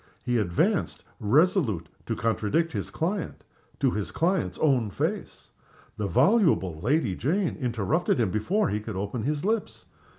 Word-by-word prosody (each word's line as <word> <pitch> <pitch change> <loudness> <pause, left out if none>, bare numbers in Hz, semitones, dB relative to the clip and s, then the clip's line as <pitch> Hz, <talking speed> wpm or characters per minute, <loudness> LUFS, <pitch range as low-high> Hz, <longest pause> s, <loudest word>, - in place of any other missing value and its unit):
He 120 -1 +1
advanced, 85 -5 0 0.2
resolute 135 - +2 0.2
to - - -1
contradict 115 +9 0
his - - -4
client, 180 +3 -3 0.4
to - - +2
his 105 -1 -3
client's 180 +2 0
own 130 -8 +2
face. 90 - -4 0.4
The 105 - -2
voluble 130 - +3
Lady 120 - +1
Jane 170 - 0
interrupted 125 - 0
him 110 -6 +1
before 180 - +1
he 105 - -1
could 110 -1 -6
open 100 +5 -3
his 150 +3 -1
lips. 220 +1 -2
125 Hz, 140 wpm, -26 LUFS, 105-165 Hz, 0.4 s, voluble